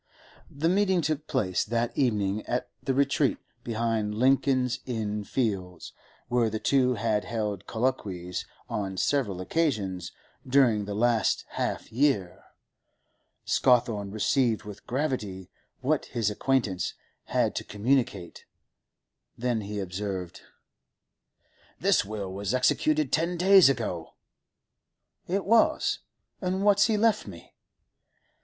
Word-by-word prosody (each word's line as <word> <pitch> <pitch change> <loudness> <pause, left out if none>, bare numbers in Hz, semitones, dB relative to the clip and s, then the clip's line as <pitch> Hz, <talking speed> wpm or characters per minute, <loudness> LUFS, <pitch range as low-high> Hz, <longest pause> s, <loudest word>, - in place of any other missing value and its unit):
The 145 +4 -1
meeting 190 0 +3
took 155 -1 -2
place 95 -9 0
that 115 +1 -1
evening 105 -5 0
at 125 - -2
the 135 - -1
retreat 140 0 +2 0.3
behind 115 -2 -1
Lincoln's 130 +1 +2
Inn 105 -4 -2
Fields 95 -8 -3 0.3
where 120 -2 +2
the 110 - -3
two 125 +1 +2
had 110 -1 0
held 105 -5 -3
colloquies 100 -8 -2 0.2
on 95 -2 -3
several 110 -7 0
occasions 95 - -1 0.4
during 125 -6 +3
the 100 0 -4
last 115 +1 +2
half - - -3
year. 115 -8 +1 1.0
Scawthorne 115 -5 +2
received 110 +2 +1
with 105 -2 -11
gravity 120 -9 -3 0.3
what - - +1
his 110 -2 -1
acquaintance 110 -5 0 0.3
had - - +1
to - - -3
communicate. 105 -4 -1 0.9
Then 120 -2 0
he 105 +1 -5
observed: 95 -1 -4 1.4
'The - - +3
will 100 -3 -5
was 100 +4 -2
executed 305 - +2
ten 170 +2 +1
days 190 -2 +7
ago.' 105 -11 -3 1.1
'It 195 +2 -1
was? 225 +3 +3 0.4
And 190 +1 -1
what's 205 +1 +5
he 220 -2 +1
left 215 - +2
me? 85 -4 -11
115 Hz, 115 wpm, -27 LUFS, 100-135 Hz, 1.4 s, days